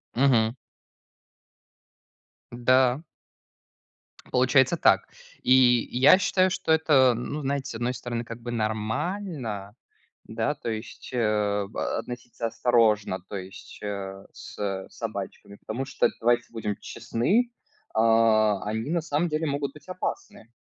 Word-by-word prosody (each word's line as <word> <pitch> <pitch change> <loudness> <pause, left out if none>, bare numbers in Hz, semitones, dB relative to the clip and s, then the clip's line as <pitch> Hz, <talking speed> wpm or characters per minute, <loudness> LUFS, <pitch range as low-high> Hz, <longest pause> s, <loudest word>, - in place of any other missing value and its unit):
Мгм. 120 -3 +3 2.0
Да. 130 +4 +3 1.3
Получается 130 +5 +4
так. - - +4 0.4
И 130 - +5 0.4
я 135 +9 +6
считаю, 190 -1 +2
что 185 -3 -2
это, 145 -6 +5
ну, 125 +6 -4
знаете, 140 -1 -2
с - - -6
одной 120 +2 -1
стороны, 120 -1 -4
как 115 +1 -8
бы 120 +1 -5
нормально. 110 - -3 0.5
Да, - - -2
то - - -7
есть, 110 +1 -7
э, 105 -3 +1
б 110 - -6 0.2
относиться 120 -1 -6
осторожно, 110 -5 +2
то 100 - -5
есть, 95 0 -9
э, 100 -1 -5
с - - -10
с 95 -2 -3
собачками. 100 -2 -6
Потому 125 +7 -5
что, - - +2
давайте 120 +1 +3
будем 105 -3 -3
честны, 200 - 0 0.4
а, 110 -2 +4
они 110 +6 -3
на 170 0 +1
самом 155 +2 0
деле 155 +1 -1
могут 140 -1 -2
быть 150 +4 -16
опасны. 180 -10 -5
120 Hz, 125 wpm, -26 LUFS, 110-140 Hz, 2.0 s, я